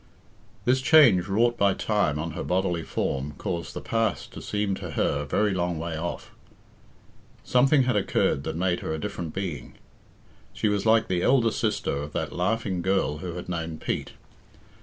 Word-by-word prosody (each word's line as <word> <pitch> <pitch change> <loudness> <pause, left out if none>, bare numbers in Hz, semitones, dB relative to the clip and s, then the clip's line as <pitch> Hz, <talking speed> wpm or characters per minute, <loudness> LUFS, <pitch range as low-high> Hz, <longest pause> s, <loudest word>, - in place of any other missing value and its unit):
This 130 +1 +3
change 130 - +6
wrought 120 +4 +2
by 100 -1 +3
time 100 -9 0
on 80 +2 -3
her - - -5
bodily 90 -2 0
form 70 -2 -3
caused 85 -1 -4
the - - -4
past 115 -1 -1
to - - -8
seem 105 -1 -1
to 90 -3 -6
her 70 - +1
a 75 - -3
very 105 +8 +1
long 90 -2 -1
way 85 0 -4
off. 85 +2 -5 1.1
Something 135 +2 +4
had 125 -3 +1
occurred 95 -7 +1
that - - -4
made 90 +1 0
her 80 - -3
a - - -5
different 80 +1 -4
being. 95 -5 -5 0.8
She 110 - 0
was 105 +1 0
like 110 0 +4
the 90 -1 0
elder 120 -1 +3
sister 110 -9 -1
of 75 +1 -6
that - - -3
laughing 95 0 -1
girl 85 -6 0
who 90 0 -5
had 90 - -6
known 85 -2 -4
Pete. - - -3
95 Hz, 180 wpm, -26 LUFS, 85-110 Hz, 1.1 s, change